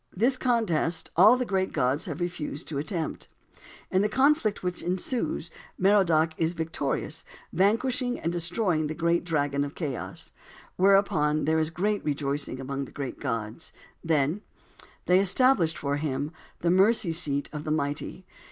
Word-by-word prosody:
This 245 Hz, +6 st, +3 dB
contest 220 Hz, -11 st, 0 dB
all 215 Hz, +8 st, +7 dB
the 250 Hz, -, -1 dB
great 190 Hz, -3 st, 0 dB
gods 135 Hz, 0 st, 0 dB
have 175 Hz, -, -5 dB
refused 170 Hz, -3 st, -4 dB
to 145 Hz, -3 st, -2 dB
attempt. 160 Hz, +2 st, -4 dB, 0.6 s
In 185 Hz, -, +3 dB
the 210 Hz, -, +1 dB
conflict 260 Hz, -3 st, +2 dB
which 180 Hz, -1 st, -3 dB
ensues 180 Hz, -, -2 dB, 0.3 s
Merodach 175 Hz, -5 st, +3 dB
is 165 Hz, +1 st, +1 dB
victorious, 160 Hz, -4 st, -3 dB, 0.3 s
vanquishing 245 Hz, -, +1 dB
and 165 Hz, -, -1 dB
destroying 175 Hz, -1 st, 0 dB
the 155 Hz, -, -4 dB
great 170 Hz, +1 st, +1 dB
dragon 145 Hz, -4 st, 0 dB
of 145 Hz, 0 st, -6 dB
chaos. 140 Hz, -8 st, -5 dB, 0.4 s
Whereupon 185 Hz, -6 st, +3 dB
there 160 Hz, +1 st, +2 dB
was 160 Hz, 0 st, +1 dB
great 205 Hz, +5 st, -1 dB
rejoicing 140 Hz, -2 st, -2 dB
among 135 Hz, +1 st, -4 dB
the -, -, -14 dB
great 140 Hz, -3 st, -6 dB
gods. 115 Hz, +5 st, -4 dB, 0.3 s
Then:— 160 Hz, +3 st, +1 dB, 0.6 s
"They 180 Hz, +1 st, +5 dB
established 195 Hz, -3 st, +3 dB
for 140 Hz, 0 st, -1 dB
him 145 Hz, 0 st, -2 dB, 0.3 s
the 170 Hz, -, +2 dB
mercy 195 Hz, 0 st, +4 dB
seat 145 Hz, -4 st, -2 dB
of 150 Hz, -1 st, -5 dB
the 155 Hz, -, -5 dB
mighty." 150 Hz, +4 st, -2 dB
165 Hz, 150 wpm, -27 LUFS, 150-195 Hz, 0.6 s, all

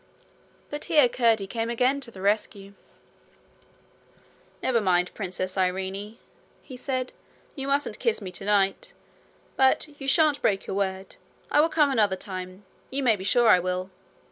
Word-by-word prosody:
But 295 Hz, 0 st, -5 dB
here 300 Hz, -6 st, +5 dB
Curdie 230 Hz, -4 st, +2 dB
came 225 Hz, +3 st, -3 dB
again 250 Hz, +4 st, +1 dB
to 250 Hz, -, -8 dB
the 195 Hz, -4 st, -11 dB
rescue. 200 Hz, -1 st, -1 dB, 1.9 s
'Never 240 Hz, -3 st, +2 dB
mind, 180 Hz, -2 st, +1 dB
Princess 185 Hz, -1 st, -4 dB
Irene,' 190 Hz, +4 st, -2 dB, 0.5 s
he 260 Hz, -, -10 dB
said. 255 Hz, 0 st, -3 dB, 0.4 s
'You 270 Hz, -2 st, -4 dB
mustn't 280 Hz, +1 st, -1 dB
kiss 460 Hz, -, 0 dB
me 190 Hz, -4 st, -7 dB
tonight. 200 Hz, -, 0 dB, 0.6 s
But 265 Hz, +3 st, +3 dB
you 270 Hz, -, -5 dB
shan't 300 Hz, 0 st, +3 dB
break 195 Hz, -2 st, +1 dB
your -, -, -4 dB
word. 190 Hz, -1 st, -3 dB, 0.3 s
I 295 Hz, -, +5 dB
will 325 Hz, -, +2 dB
come 300 Hz, -3 st, +3 dB
another 210 Hz, -6 st, +2 dB
time. 185 Hz, 0 st, -8 dB, 0.2 s
You 275 Hz, +1 st, -3 dB
may 235 Hz, -4 st, +4 dB
be 190 Hz, -, -8 dB
sure 235 Hz, +4 st, +3 dB
I 180 Hz, -, +7 dB
will.' 185 Hz, +1 st, -3 dB
210 Hz, 150 wpm, -26 LUFS, 190-265 Hz, 1.9 s, I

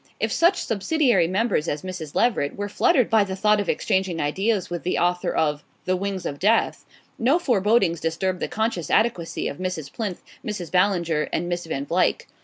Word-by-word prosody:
If -, -, 0 dB
such 345 Hz, +3 st, +3 dB
subsidiary 225 Hz, -, +2 dB
members 190 Hz, -3 st, 0 dB
as 145 Hz, -1 st, -3 dB
Mrs. 180 Hz, -5 st, -7 dB
Leveret 220 Hz, -12 st, +1 dB
were 205 Hz, 0 st, -3 dB
fluttered 260 Hz, -, +3 dB
by 220 Hz, -1 st, +4 dB
the 190 Hz, -1 st, -4 dB
thought 210 Hz, +2 st, +3 dB
of 205 Hz, -, -2 dB
exchanging 190 Hz, -3 st, 0 dB
ideas 195 Hz, +7 st, 0 dB
with 175 Hz, -1 st, -4 dB
the 180 Hz, -, -1 dB
author 175 Hz, 0 st, +1 dB
of 150 Hz, -1 st, 0 dB, 0.2 s
"The 185 Hz, -, +1 dB
Wings 195 Hz, 0 st, -3 dB
of 140 Hz, -, -4 dB
Death," 220 Hz, +4 st, +2 dB, 0.3 s
no 260 Hz, +8 st, +3 dB
forebodings 210 Hz, -, +2 dB
disturbed 180 Hz, +3 st, -1 dB
the -, -, -2 dB
conscious 220 Hz, -8 st, -2 dB
adequacy 210 Hz, -7 st, +1 dB
of -, -, -5 dB
Mrs. 180 Hz, -6 st, -4 dB
Plinth, 205 Hz, -6 st, -4 dB, 0.2 s
Mrs. 210 Hz, -, -5 dB
Ballinger 175 Hz, -5 st, +1 dB
and 175 Hz, -, -1 dB
Miss 175 Hz, -1 st, -3 dB
Van 140 Hz, -3 st, -3 dB
Vluyck. 185 Hz, -, +1 dB
185 Hz, 185 wpm, -24 LUFS, 170-215 Hz, 0.3 s, by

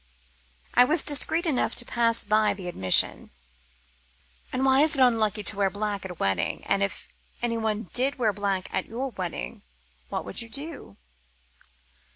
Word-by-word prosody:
I 245 Hz, -, +7 dB
was 300 Hz, +5 st, +3 dB
discreet 320 Hz, +4 st, +4 dB
enough 295 Hz, -7 st, 0 dB
to 240 Hz, -, -1 dB
pass 230 Hz, -1 st, +1 dB
by 215 Hz, 0 st, +2 dB
the 190 Hz, -3 st, -8 dB
admission. 95 Hz, -, +1 dB, 1.2 s
"And 260 Hz, +1 st, -1 dB
why 265 Hz, +1 st, +5 dB
is 310 Hz, 0 st, +5 dB
it -, -, 0 dB
unlucky 220 Hz, -5 st, +3 dB
to 210 Hz, -, 0 dB
wear 200 Hz, -1 st, +1 dB
black 205 Hz, 0 st, -4 dB
at -, -, -5 dB
a 180 Hz, -, -8 dB
wedding? 95 Hz, -, -1 dB
And 195 Hz, -, +1 dB
if 195 Hz, -3 st, -3 dB, 0.4 s
anyone 220 Hz, -3 st, -2 dB
did 270 Hz, +3 st, +1 dB
wear 225 Hz, -5 st, +1 dB
black 195 Hz, -2 st, -2 dB
at -, -, -2 dB
your 255 Hz, +4 st, -4 dB
wedding, 175 Hz, -, -5 dB, 0.5 s
what -, -, -4 dB
would -, -, -1 dB
you 230 Hz, -, -8 dB
do?" 280 Hz, -, -7 dB
220 Hz, 165 wpm, -26 LUFS, 195-255 Hz, 1.2 s, I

